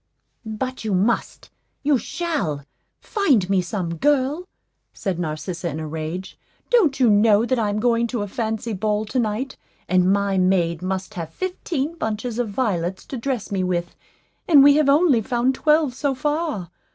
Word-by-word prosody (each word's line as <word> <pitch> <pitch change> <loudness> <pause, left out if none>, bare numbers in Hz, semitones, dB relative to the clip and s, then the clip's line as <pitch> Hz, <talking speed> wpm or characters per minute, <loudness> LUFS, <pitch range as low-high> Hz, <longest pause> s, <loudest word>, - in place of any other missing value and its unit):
"But 255 +4 -4
you 210 -3 0
must, 205 +6 -1 0.3
you 285 -2 +3
shall, 290 - -3 0.3
find 285 - +1
me 190 -2 +3
some, 175 -2 -4
girl," 290 - +1 0.5
said 190 -5 -3
Narcissa, 170 +2 -3
in 155 0 -5
a 160 - -4
rage. 160 +4 -5 0.3
"Don't 335 - +3
you 250 - +5
know 210 +1 +4
that 255 0 0
I'm 210 -2 0
going 235 0 +2
to 235 -3 -2
a - - -4
fancy 220 +2 -3
ball 210 +2 -1
to 255 +4 -2
night, 235 +4 -2 0.3
and 185 +1 +3
my 200 -1 +1
maid 180 -3 +1
must 190 +1 -3
have 165 -3 -5
fifteen 335 - -3
bunches 220 +2 -3
of 240 -3 -1
violets 190 -5 -2
to 265 - -6
dress 245 -3 -3
me 190 -2 0
with, 175 -1 -2 0.5
and 290 -5 +7
we 285 +1 +7
have 300 -2 +3
only 285 -4 +4
found 245 +3 +1
twelve 300 -1 +2
so 275 +1 -1
far? 295 - -2
220 Hz, 165 wpm, -22 LUFS, 185-270 Hz, 0.5 s, and